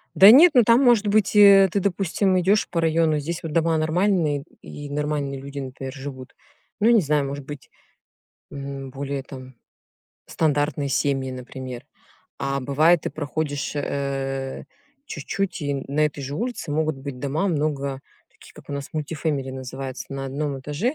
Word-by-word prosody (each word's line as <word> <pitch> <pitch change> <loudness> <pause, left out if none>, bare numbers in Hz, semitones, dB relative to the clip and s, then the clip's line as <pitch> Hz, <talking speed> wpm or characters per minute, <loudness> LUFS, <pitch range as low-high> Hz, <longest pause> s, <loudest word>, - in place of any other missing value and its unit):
Да 195 +2 +9
нет, 300 +9 +9
ну, 245 - +6
там, 230 +4 +5
может 235 -5 +4
быть, 210 0 +2
э, 200 -2 +8
ты, 200 - +1
допустим, 190 0 +1
идешь 200 +4 +2
по 170 - -1
району, 160 -1 +2
здесь 165 +4 -4
вот 160 - -5
дома 165 0 +2
нормальные 160 -3 +1 0.2
и 145 0 -9
нормальные 145 -2 -2
люди, 140 +1 -9
например, 135 0 -6
живут. 135 -2 -9 0.4
Ну, 220 - +3
я 240 - +6
не 225 - +5
знаю, 150 -2 +1
может 140 0 -6
быть, 145 -1 -9 0.8
м, 140 -1 -7
более 140 0 -4
там, 130 -2 -11 0.7
стандартные 145 -2 0
семьи, 135 -1 0
например. 130 0 -8 0.5
А 140 0 -2
бывает 155 +6 +3
ты - - -3
проходишь, 145 -1 -3
э, 135 -2 -3 0.4
чуть-чуть 180 +3 -4
и 145 - -2
н 135 -1 -4
на 145 +2 -1
этой 145 -1 -6
же 140 +2 -5
улице 235 -6 -4
могут 155 -1 0
быть 135 -1 -7
дома 150 +9 -1
много 145 -4 -1 0.3
таких - - -18
как - - -15
у - - -4
нас 140 -1 -5
multi-family 150 -3 -2
называются 130 0 -6
на 135 0 -4
1 140 0 -3
этаже 150 - -2
145 Hz, 165 wpm, -23 LUFS, 135-170 Hz, 0.8 s, Да